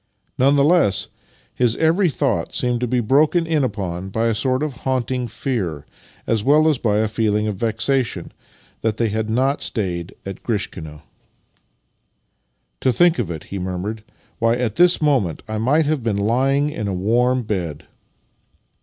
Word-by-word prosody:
None 135 Hz, +3 st, +4 dB
the 140 Hz, -, +4 dB
less, 140 Hz, -, +3 dB, 0.4 s
his 120 Hz, -2 st, +1 dB
every 165 Hz, +4 st, +3 dB
thought 130 Hz, -, -1 dB
seemed 125 Hz, -1 st, 0 dB
to 125 Hz, -, -1 dB
be 125 Hz, +1 st, +1 dB
broken 150 Hz, +8 st, +3 dB
in 160 Hz, -3 st, +1 dB
upon 95 Hz, -6 st, -3 dB
by 110 Hz, +4 st, -1 dB
a -, -, +1 dB
sort 130 Hz, +5 st, 0 dB
of 155 Hz, -3 st, -2 dB
haunting 130 Hz, -1 st, -1 dB
fear, 100 Hz, -, -3 dB, 0.4 s
as 110 Hz, -2 st, 0 dB
well 150 Hz, +4 st, +4 dB
as 150 Hz, -5 st, +2 dB
by 105 Hz, -3 st, +1 dB
a 110 Hz, +1 st, +2 dB
feeling 105 Hz, -1 st, 0 dB
of 105 Hz, -3 st, -3 dB
vexation 115 Hz, +4 st, -1 dB, 0.5 s
that 110 Hz, -1 st, -1 dB
they 115 Hz, -2 st, +1 dB
had 110 Hz, +1 st, -2 dB
not 130 Hz, +5 st, +1 dB
stayed 90 Hz, -5 st, -3 dB
at 95 Hz, -1 st, -7 dB
Grishkino. 80 Hz, -9 st, -4 dB, 0.9 s
" -, -, -49 dB
To 130 Hz, -, +3 dB
think 175 Hz, +2 st, +3 dB
of 105 Hz, -8 st, -1 dB
it! 80 Hz, -3 st, -5 dB
" -, -, -25 dB
he 100 Hz, -, -3 dB
murmured. 95 Hz, +4 st, -4 dB, 0.2 s
" -, -, -36 dB
'Way, 115 Hz, +1 st, +2 dB
at 115 Hz, -4 st, -1 dB
this 175 Hz, -2 st, +4 dB
moment 125 Hz, -, +1 dB
I 110 Hz, 0 st, -3 dB
might 145 Hz, +8 st, +2 dB
have 150 Hz, -2 st, 0 dB
been 115 Hz, -3 st, -1 dB
lying 135 Hz, +7 st, +1 dB
in 110 Hz, -8 st, -4 dB
a 95 Hz, -, -2 dB
warm 120 Hz, +6 st, +1 dB
bed! 85 Hz, -8 st, -4 dB
115 Hz, 175 wpm, -21 LUFS, 100-135 Hz, 0.9 s, None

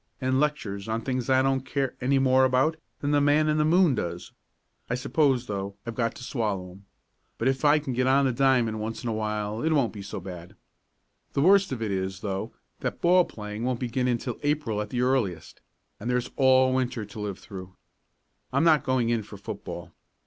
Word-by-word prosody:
"And 130 Hz, 0 st, +1 dB
lectures 110 Hz, -10 st, -1 dB
on 110 Hz, +1 st, -1 dB
things 130 Hz, +1 st, -2 dB
I 130 Hz, 0 st, +4 dB
don't 135 Hz, -1 st, +1 dB
care 135 Hz, 0 st, -2 dB
any 135 Hz, +2 st, +2 dB
more 130 Hz, 0 st, +4 dB
about 130 Hz, +5 st, +3 dB, 0.3 s
than 145 Hz, -, 0 dB
the 145 Hz, -1 st, +3 dB
man 145 Hz, +2 st, +3 dB
in 155 Hz, 0 st, +2 dB
the -, -, +4 dB
moon 170 Hz, 0 st, +4 dB
does. 85 Hz, -5 st, -4 dB, 0.6 s
I 120 Hz, -, +1 dB
suppose, 130 Hz, -1 st, +1 dB
though, 100 Hz, -2 st, -4 dB
I've 115 Hz, -, -4 dB
got 115 Hz, -1 st, -1 dB
to -, -, -10 dB
swallow 105 Hz, -8 st, -2 dB
'em. 100 Hz, +2 st, -16 dB, 0.5 s
But 115 Hz, -, 0 dB
if 135 Hz, +1 st, 0 dB
I 150 Hz, +1 st, +6 dB
can 145 Hz, -4 st, -3 dB
get 130 Hz, +1 st, +1 dB
on 135 Hz, +1 st, +4 dB
the 130 Hz, -, +2 dB
diamond 125 Hz, -4 st, +2 dB
once 110 Hz, +4 st, -4 dB
in 120 Hz, -, -2 dB
a -, -, -1 dB
while 105 Hz, 0 st, -2 dB
it 160 Hz, -, +1 dB
won't 135 Hz, -6 st, +2 dB
be 105 Hz, -, -7 dB
so 100 Hz, 0 st, -6 dB
bad. 90 Hz, -2 st, -9 dB, 0.8 s
The 140 Hz, -, +1 dB
worst 195 Hz, +2 st, +5 dB
of 120 Hz, -4 st, -3 dB
it 105 Hz, -, -2 dB
is, 95 Hz, 0 st, -3 dB
though, 95 Hz, -1 st, -3 dB, 0.3 s
that -, -, -3 dB
ball 180 Hz, +1 st, +5 dB
playing 105 Hz, +1 st, -7 dB
won't 125 Hz, -1 st, -1 dB
begin 125 Hz, 0 st, -1 dB
until 120 Hz, 0 st, -2 dB
April 145 Hz, -8 st, 0 dB
at 105 Hz, -, -5 dB
the 125 Hz, +1 st, -1 dB
earliest, 120 Hz, -10 st, -1 dB, 0.4 s
and 115 Hz, -, -4 dB
there's 125 Hz, 0 st, 0 dB
all 130 Hz, -1 st, +5 dB
winter 125 Hz, -4 st, -1 dB
to 105 Hz, +2 st, -10 dB
live 100 Hz, -3 st, -4 dB
through. 95 Hz, -1 st, -10 dB, 0.8 s
I'm 140 Hz, +3 st, +2 dB
not 160 Hz, -3 st, +5 dB
going 130 Hz, -3 st, +1 dB
in 115 Hz, -1 st, +1 dB
for 100 Hz, 0 st, -11 dB
football. 100 Hz, -, -7 dB
125 Hz, 210 wpm, -26 LUFS, 105-135 Hz, 0.8 s, I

